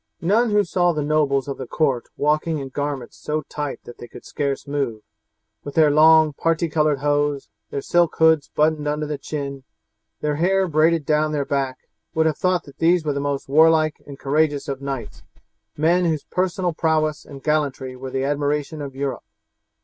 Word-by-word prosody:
None 215 Hz, +7 st, +2 dB
who 210 Hz, 0 st, +3 dB
saw 175 Hz, -1 st, +1 dB
the 150 Hz, -2 st, -2 dB
nobles 145 Hz, -2 st, +1 dB
of 140 Hz, -, -5 dB
the 130 Hz, -, -5 dB
court 135 Hz, -6 st, 0 dB
walking 155 Hz, +2 st, +1 dB
in 135 Hz, -2 st, -5 dB
garments 145 Hz, -2 st, -4 dB
so 155 Hz, 0 st, -3 dB
tight 145 Hz, 0 st, -5 dB
that 120 Hz, -, -12 dB
they 120 Hz, -, -9 dB
could -, -, -13 dB
scarce 140 Hz, -2 st, -3 dB
move, 140 Hz, -7 st, -3 dB, 0.6 s
with 145 Hz, -, -8 dB
their 155 Hz, -2 st, +5 dB
long 155 Hz, 0 st, +6 dB
parti 165 Hz, +3 st, 0 dB
coloured 150 Hz, -3 st, +1 dB
hose, 145 Hz, -1 st, 0 dB, 0.2 s
their 140 Hz, -, -4 dB
silk 175 Hz, +1 st, +2 dB
hoods 160 Hz, -2 st, +4 dB
buttoned 150 Hz, -1 st, +1 dB
under 150 Hz, +1 st, -1 dB
the 150 Hz, -1 st, -4 dB
chin, 140 Hz, -2 st, -5 dB, 0.6 s
their 150 Hz, -1 st, -1 dB
hair 190 Hz, +3 st, +2 dB
braided 160 Hz, -1 st, +2 dB
down 155 Hz, 0 st, +1 dB
their 145 Hz, -2 st, -1 dB
back, 135 Hz, -2 st, -3 dB, 0.3 s
would 160 Hz, 0 st, +3 dB
have 155 Hz, -2 st, +1 dB
thought 185 Hz, -3 st, +1 dB
that 140 Hz, -, -16 dB
these 170 Hz, 0 st, +3 dB
were 150 Hz, -, 0 dB
the 140 Hz, -, -2 dB
most 140 Hz, -1 st, -2 dB
warlike 155 Hz, +2 st, +4 dB
and 140 Hz, -1 st, -9 dB
courageous 145 Hz, +1 st, 0 dB
of 135 Hz, -1 st, -4 dB
knights, 135 Hz, -6 st, -5 dB, 0.6 s
men 170 Hz, +4 st, +3 dB
whose 160 Hz, -3 st, 0 dB
personal 180 Hz, -1 st, -1 dB
prowess 155 Hz, -2 st, 0 dB
and 135 Hz, -2 st, -12 dB
gallantry 140 Hz, -4 st, -1 dB
were 130 Hz, +1 st, -7 dB
the 130 Hz, +1 st, -2 dB
admiration 145 Hz, +2 st, -1 dB
of 140 Hz, -2 st, -7 dB
Europe. 135 Hz, -1 st, -4 dB
150 Hz, 185 wpm, -22 LUFS, 140-160 Hz, 0.6 s, long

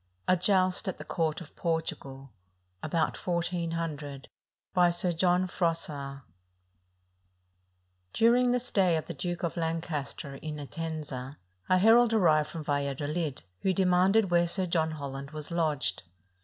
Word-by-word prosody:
A 185 Hz, -, +5 dB
JOUST 185 Hz, +2 st, +2 dB
AT 190 Hz, -, -2 dB
THE -, -, -8 dB
COURT 160 Hz, -1 st, -1 dB
OF 170 Hz, -, -12 dB
PORTUGAL 140 Hz, -5 st, -3 dB, 0.5 s
[About 160 Hz, +1 st, 0 dB
1400] 165 Hz, -5 st, -3 dB, 0.5 s
BY 180 Hz, -2 st, +5 dB
SIR 175 Hz, +1 st, 0 dB
JOHN 180 Hz, +2 st, +2 dB
FROISSAST 155 Hz, -6 st, -3 dB, 1.9 s
During 240 Hz, -, +4 dB
the 250 Hz, -, +3 dB
stay 195 Hz, -8 st, +2 dB
of 160 Hz, -, -2 dB
the 170 Hz, -, -6 dB
Duke 175 Hz, +3 st, -4 dB
of 170 Hz, 0 st, -2 dB
Lancaster 160 Hz, -4 st, -3 dB
in 155 Hz, +1 st, -6 dB
Enten^a, 145 Hz, -3 st, -5 dB, 0.3 s
a 185 Hz, -, +5 dB
herald 225 Hz, +4 st, +6 dB
arrived 155 Hz, -7 st, +4 dB
from 165 Hz, -2 st, -6 dB
Valladolid, 145 Hz, +1 st, -2 dB, 0.2 s
who 190 Hz, -, +1 dB
demanded 185 Hz, +2 st, +3 dB
where 175 Hz, 0 st, +4 dB
Sir 185 Hz, +2 st, +1 dB
John 165 Hz, -2 st, +1 dB
Holland 140 Hz, -3 st, -6 dB
was 155 Hz, +1 st, -8 dB
lodged. 150 Hz, -, 0 dB
165 Hz, 130 wpm, -29 LUFS, 150-180 Hz, 1.9 s, herald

